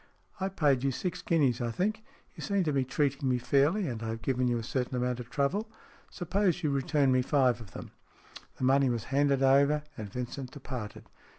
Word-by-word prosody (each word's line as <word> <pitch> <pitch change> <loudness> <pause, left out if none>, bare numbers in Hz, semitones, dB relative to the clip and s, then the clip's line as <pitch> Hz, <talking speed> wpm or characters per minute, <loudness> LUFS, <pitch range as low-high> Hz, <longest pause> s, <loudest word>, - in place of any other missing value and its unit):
I 190 +1 -1
paid 145 -8 +2
you 135 - +2
six 175 +7 -4
guineas, 135 -8 +1
I 120 - -1
think. 215 - -1 0.3
You - - -10
seem 200 -2 0
to 155 -3 0
be 135 -1 +2
treating 140 +1 0
me 125 - +2
fairly, 145 - +2
and 115 -3 -4
I 115 - -4
have 115 0 -5
given 125 -1 +1
you 120 -1 +1
a 115 - -4
certain 125 +2 -2
amount 125 0 -1
of 120 -1 -8
trouble. 185 - -1 0.4
Supposing 180 0 0
you - - 0
return 140 0 +2
me 130 0 +3
five 125 -3 +2
of 100 -6 -13
them." - - -8 0.7
The - - -5
money 135 +1 +4
was 120 -3 -1
handed 140 -1 +3
over, 140 +3 +4
and 105 -3 -7
Vincent 125 +2 -5
departed. 130 -7 -7
135 Hz, 205 wpm, -30 LUFS, 125-150 Hz, 0.7 s, money